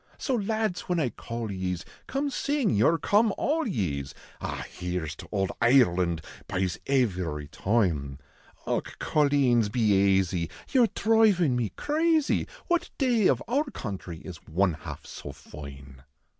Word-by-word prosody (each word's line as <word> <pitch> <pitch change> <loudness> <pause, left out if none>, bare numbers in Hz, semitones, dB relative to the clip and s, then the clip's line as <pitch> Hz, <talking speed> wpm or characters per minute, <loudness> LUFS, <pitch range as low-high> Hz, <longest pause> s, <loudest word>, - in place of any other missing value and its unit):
So 270 - -2
lads 215 -3 -1
whin 175 -1 +2
I 140 -6 +1
call 115 -2 -5
ye 95 -1 -2
s, 85 - -10 0.2
come 280 +1 -1
sing 280 - 0
vour 160 +10 +4
"Come 210 +5 +3
all 320 0 0
ye 95 - -1
s," 70 - -10 0.3
Ah! - - -4
here 90 -1 -4
s 75 - -5
to - - -11
ould 95 -2 0
Ireland, 90 -10 +4 0.3
byes, 95 -2 -1
ivery 90 - 0
toime; 80 -10 0 0.5
Deli, - - +1 0.2
coleens, 135 -7 +2
be 100 -4 +4
aisy, 90 -3 0 0.2
your 250 -4 +5
dhrivin 210 - +3
me 120 -4 0
crazy. 315 0 +1 0.2
What 345 -1 0
day 240 -7 +3
of - - +2
our 280 +6 +1
country 95 - -6
is 90 -3 -8
one 90 +2 +2
half 80 - -8
so 70 - -8
foine 70 -2 -11
110 Hz, 150 wpm, -27 LUFS, -, 0.5 s, your